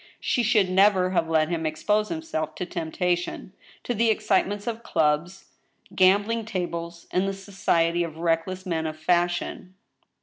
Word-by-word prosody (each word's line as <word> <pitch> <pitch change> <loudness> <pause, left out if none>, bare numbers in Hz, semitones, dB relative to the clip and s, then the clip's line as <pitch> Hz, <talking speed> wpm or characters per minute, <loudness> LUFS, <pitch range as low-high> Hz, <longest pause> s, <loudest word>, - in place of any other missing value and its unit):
She 245 - 0
should 210 -4 +3
never 185 0 +4
have 165 -3 0
let 160 -1 +2
him 170 -2 -2
expose 210 +7 0
himself 240 - -4
to 180 - -4
temptation, 175 +2 -2 0.3
to 245 - -2
the 230 +1 +2
excitements 205 -1 +1
of 230 -1 -3
clubs, 160 0 0 0.5
gambling 205 +5 +3
tables, 170 -4 -4
and 185 +2 +1
the 195 - -1
society 175 -3 0
of 160 -2 -6
reckless 170 +3 -1
men 160 -3 -1
of 155 0 -6
fashion. 175 +2 -1
180 Hz, 145 wpm, -25 LUFS, 165-200 Hz, 0.5 s, never